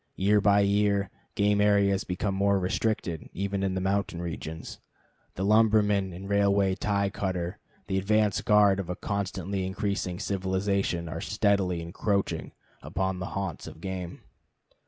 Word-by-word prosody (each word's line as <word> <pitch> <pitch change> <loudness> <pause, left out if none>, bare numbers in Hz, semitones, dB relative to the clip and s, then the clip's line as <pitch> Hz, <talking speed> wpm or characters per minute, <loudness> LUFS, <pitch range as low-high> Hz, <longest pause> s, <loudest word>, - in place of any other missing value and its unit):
Year 105 +2 +3
by 100 0 +5
year 100 0 +2 0.2
game 105 0 +3
areas 100 -1 +3
become 95 +2 -2
more 100 +1 +2
restricted, 90 -3 -1
even 100 +1 -2
in 95 -1 0
the - - 0
mountain 95 -2 -1
regions. 80 -2 -6 0.6
The 95 - -2
lumberman 105 -2 +3
and 95 +3 -8
railway 100 -1 +3
tie 100 0 0
cutter, 95 -1 -3 0.3
the 95 -2 0
advance 105 +1 +2
guard 105 -2 +4
of 95 - -4
a 90 - -2
constantly 95 -1 -3
increasing 95 -1 -2
civilization, 95 -2 -1
are 80 +1 -5
steadily 100 -4 +1
encroaching 100 +4 -1 0.3
upon 95 0 -2
the 90 - -4
haunts 95 -3 -4
of - - -10
game. 90 -1 -6
100 Hz, 140 wpm, -28 LUFS, 95-100 Hz, 0.6 s, by